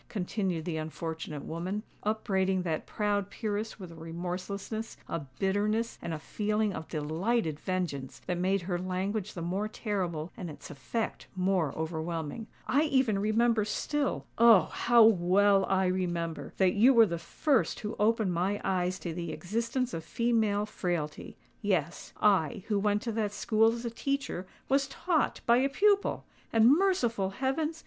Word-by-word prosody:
continued 185 -4 -2
the 170 -3 -2
unfortunate 160 -1 -5
woman, 185 +6 -3 0.2
upbraiding 190 -3 0
that 160 -3 -2
proud 205 -2 -1
peeress 215 +1 -3
with 185 -3 -8
a - - -11
remorselessness, 180 +6 -5
a 165 - -2 0.2
bitterness, 210 +4 0
and 170 - -4
a 160 - -2
feeling 210 +5 -1
of 160 - -6
delighted 160 +2 -1
vengeance 165 -9 -3
that 180 -1 -2
made 190 +1 +1
her 175 0 -2
language 190 +3 -2
the 170 - -4
more 190 +5 -1
terrible 185 -7 -3
and 180 - -6
its 150 - -10
effect 220 - -4
more 185 -5 +1
overwhelming. 160 +5 -4 0.2
"I 290 +4 +3
even 260 -8 +2
remember 220 +2 +2
still—oh! 235 -3 +3
how 235 -1 +5
well 195 -1 +5
I 190 0 +3
remember—that 180 0 0
you 245 +6 +5
were 230 -1 +8
the 170 -4 -3
first 265 - 0
who 210 +1 -4
opened 215 -3 +2
my 190 +4 0
eyes 185 -1 0
to 170 - -4
the 170 -1 -4
existence 230 +9 -2
of 165 - -4
female 220 0 +1
frailty. 175 -7 -4 0.2
Yes—I, 190 +2 +1
who 205 -2 +2
went 205 +1 +1
to 235 - -2
that 215 -2 -1
school 225 +1 +3
as 235 +1 -5
a 235 - -2
teacher, 275 -7 -3 0.2
was 275 +1 +2
taught 330 +2 0
by 235 0 +5
a 270 +2 +2
pupil! 405 +7 +2 0.3
And 230 +5 +6
merciful 250 - +1
heavens! 280 +9 -1
200 Hz, 150 wpm, -30 LUFS, 175-225 Hz, 0.3 s, were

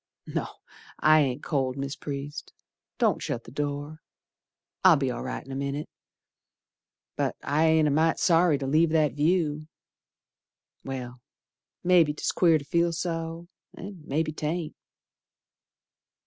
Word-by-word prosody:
No. - - -3 0.5
I 155 0 +6
ain't 130 -4 0
cold, 135 -4 -1
Mis' 140 +1 -3
Priest, 145 +1 -6 0.4
Don't - - +2
shut 115 - -3
th' 115 - -13
door. 145 +2 -4 0.8
I'll 185 -3 +8
be 135 -3 0
all - - -5
right 130 - -5
in 135 - -10
a - - -4
minit. 140 +2 -3 1.3
But - - -1
I 150 +3 +2
ain't 160 -1 +4
a - - +2
mite 160 +3 +2
sorry 165 -3 +4
to 135 - -4
leave 155 +4 +3
that 155 -4 +2
view. 155 0 +1 1.2
Well, 125 -2 -6 0.6
mebbe 175 -4 +4
'tis - - 0
queer 165 -3 +4
to 140 - -9
feel 170 +3 +1
so, 165 0 -4 0.3
An' 195 -3 -9
mebbe 155 +2 -1
'taint. 155 +1 -3
150 Hz, 135 wpm, -27 LUFS, 140-165 Hz, 1.3 s, I'll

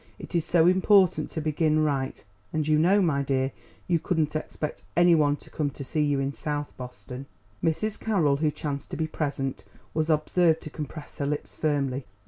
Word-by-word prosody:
It - - -10
is 170 -2 +2
so 165 -2 +4
important 185 -3 +4
to 160 - -4
begin 155 0 +2
right; 135 -3 -1 0.3
and 155 -1 -1
you 155 -1 +4
know, 190 +5 +4
my 145 -5 +2
dear, 135 -1 0 0.4
you 170 -2 +2
couldn't 155 -2 0
expect 155 0 -4
any 175 0 +6
one 145 -3 +4
to - - -17
come 150 -2 -1
to 140 - -8
see 155 +3 -1
you 145 -2 +2
in 135 +1 -1
South 145 0 -4
Boston." 125 +1 -8 0.4
Mrs. 200 +7 0
Carroll, 165 -11 +2
who 155 +1 +2
chanced 145 -1 -4
to - - -5
be 160 - 0
present, 140 -4 -3 0.3
was 155 0 0
observed 160 +2 +3
to 155 - -8
compress 150 +1 -8
her 140 - 0
lips 150 0 -3
firmly. 140 -4 0
155 Hz, 190 wpm, -27 LUFS, 140-165 Hz, 0.4 s, any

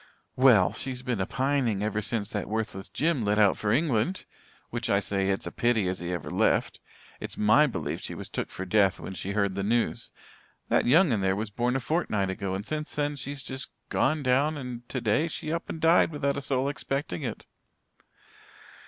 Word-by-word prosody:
"Well, 125 -8 +5
she's 130 -1 -4
been 125 -6 -1
a 95 - -1
pining 130 -6 0
ever 105 0 -1
since 105 0 -3
that 105 -3 -3
worthless 105 -3 -3
Jim 155 -5 0
lit 105 0 +1
out 105 -3 +5
for 105 - -1
England 145 - +1 0.5
which - - -2
I 100 - +4
say 100 -1 -1
it's 95 - -1
a - - -4
pity 120 -5 +1
as 95 0 -2
he 85 0 -4
ever 85 - -4
left. - - +1 0.4
It's - - -6
my 110 +8 +5
belief 125 - -4
she - - -5
was - - -6
took - - -4
for 95 - -6
death 95 -1 +3
when - - -6
she 95 +1 -4
heard 100 -2 +1
the 100 - -2
news. 115 +4 0 0.6
That - - +3
young 160 +4 +5
un 110 -4 +1
there 95 0 +2
was 105 +1 -3
born 120 +4 0
a - - +2
fortnight 110 - 0
ago 95 0 -3
and 100 +2 -5
since 155 0 -3
then 145 0 0
she's 140 0 -5
just 130 +2 -4 0.2
gone 155 -2 +1
down 140 +4 +2
and 125 -3 -7
today 130 +5 +1
she 155 -1 -4
up 165 - -4
and 160 - -4
died, 165 +1 +5
without 140 -3 -1
a 140 - -3
soul 135 -1 0
expecting 135 - -3
it." - - -5
120 Hz, 205 wpm, -27 LUFS, 100-140 Hz, 0.6 s, Well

